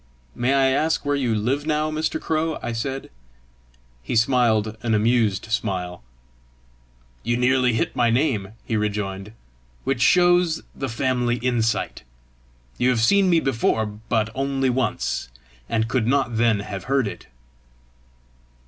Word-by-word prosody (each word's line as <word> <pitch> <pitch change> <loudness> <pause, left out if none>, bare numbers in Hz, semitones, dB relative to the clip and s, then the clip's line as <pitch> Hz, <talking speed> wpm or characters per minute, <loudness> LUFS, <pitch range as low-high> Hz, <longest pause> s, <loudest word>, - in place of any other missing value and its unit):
"May 125 +3 +1
I 135 -1 +4
ask 155 +3 0
where 145 0 +1
you 125 -5 0
live 135 +8 -1
now, 155 0 0
Mr. 155 +1 -1
Crow?" 160 0 -1
I - - -2
said. 135 +4 -4 0.9
He - - -4
smiled 115 -3 +2
an 115 -2 +1
amused 110 -2 +1
smile. 90 -5 -2 1.2
"You 120 +1 0
nearly 125 0 +3
hit 110 - -1
my 120 -1 +3
name," 115 -5 0
he 115 - -2
rejoined, 105 -2 -2 0.5
"which 135 -3 -1
shows 175 +1 +4
the 135 - -4
family 125 0 0
insight. 120 -2 -1 0.8
You 125 - +3
have 120 -3 +1
seen 190 - +4
me 170 -2 +4
before, 115 -5 0
but 110 +1 -2
only 135 0 0
once, 120 - -2 0.4
and 110 0 0
could 115 -1 0
not 130 -3 +1
then 115 -2 +2
have 100 -2 -7
heard 135 -3 +1
it!" - - -8
120 Hz, 140 wpm, -23 LUFS, 110-135 Hz, 1.2 s, I